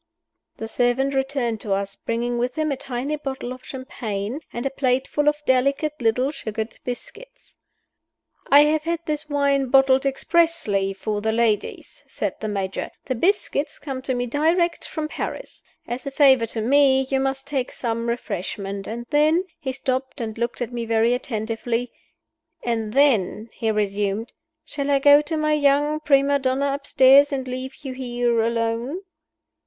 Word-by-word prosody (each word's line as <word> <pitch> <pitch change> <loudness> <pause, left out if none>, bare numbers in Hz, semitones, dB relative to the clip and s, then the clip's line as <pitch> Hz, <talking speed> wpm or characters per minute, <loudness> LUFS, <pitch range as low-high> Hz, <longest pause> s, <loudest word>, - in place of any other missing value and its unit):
The 225 - -5
servant 245 +4 +1
returned 265 -5 -1
to 205 - -1
us, 195 0 -2
bringing 240 +1 -2
with 250 +1 -1
him 310 -1 0
a - - 0
tiny 265 +3 -3
bottle 265 -3 -5
of 255 - -13
champagne 235 -3 -5
and 240 - -5
a 270 - 0
plateful 270 +2 0
of 295 0 -4
delicate 275 +4 +2
little 250 +4 +2
sugared 220 -5 -5
biscuits. - - -9 0.9
"I 285 +1 +8
have 305 +1 +3
had 335 +1 -2
this 300 0 -3
wine 280 -2 +2
bottled 270 +1 +4
expressly 275 - +1
for 205 +2 -3
the 220 +1 0
ladies," 225 -2 -1
said - - -3
the 215 - -4
Major. 195 -2 -3 0.2
"The 260 - -1
biscuits 310 - 0
came 270 -3 -6
to 260 -1 -2
me 245 0 -1
direct 330 +7 +1
from 310 -2 -4
Paris. - - -6 0.3
As 250 +3 -5
a - - 0
favor 265 -4 +4
to 225 0 -3
me, 265 +2 +4
you 265 0 -1
must 270 0 -2
take 275 -3 -2
some 230 -1 -2
refreshment. 200 -3 -4
And 235 +2 -5
then 310 +4 +4
" - - -48
He 265 -3 -2
stopped 260 +1 -3
and 220 -2 -4
looked 235 +1 -2
at 245 0 -7
me 235 -1 -3
very 230 +1 +2
attentively. 230 0 -2 0.7
"And 225 -3 -1
then," 230 -5 +2
he 225 - -2
resumed, 205 +1 -1 0.3
"shall 285 -1 -4
I 280 - +4
go 285 +1 +7
to 315 +2 -3
my 305 0 +1
young 295 +1 +2
prima 280 -1 +3
donna 270 +1 0
upstairs 280 0 +5
and 265 -2 -3
leave 255 +1 -5
you 265 -2 -5
here 240 -2 0
alone?" 230 +7 -1
260 Hz, 165 wpm, -23 LUFS, 230-285 Hz, 0.9 s, I